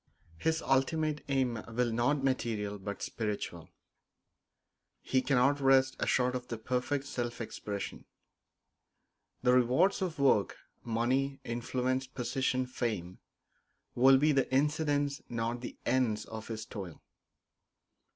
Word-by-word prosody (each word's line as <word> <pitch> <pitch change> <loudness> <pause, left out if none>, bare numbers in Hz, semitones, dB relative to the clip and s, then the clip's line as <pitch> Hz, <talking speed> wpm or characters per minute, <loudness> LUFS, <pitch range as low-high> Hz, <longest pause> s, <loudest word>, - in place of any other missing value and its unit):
His 160 0 0
ultimate 150 +3 +1
aim 130 -5 +1
will 120 +1 0
be - - -2
not 135 +4 +1
material 110 -6 -1
but 100 +1 -5
spiritual; 100 -6 -4 1.3
he 130 - +2
cannot 135 +2 +3
rest 135 -1 +4
short 125 0 +2
of 125 0 -4
the 115 - -4
perfect 125 +4 -1
self 120 -3 -4
expression. 105 -3 -5 1.4
The 125 0 +5
rewards 125 +12 +3
of 180 -4 -2
work 135 -8 +3 0.3
money, 130 +4 0
influence, 125 +2 -1
position, 130 0 -1
fame 110 -8 -3 0.7
will 130 +2 +6
be 150 +3 +4
the 135 -3 +1
incidents, 145 0 +1
not 115 +1 -2
the - - -7
ends, 125 -5 +1
of 110 -1 -8
his 110 -1 -5
toil. 95 -7 -8
125 Hz, 120 wpm, -31 LUFS, 115-135 Hz, 1.4 s, will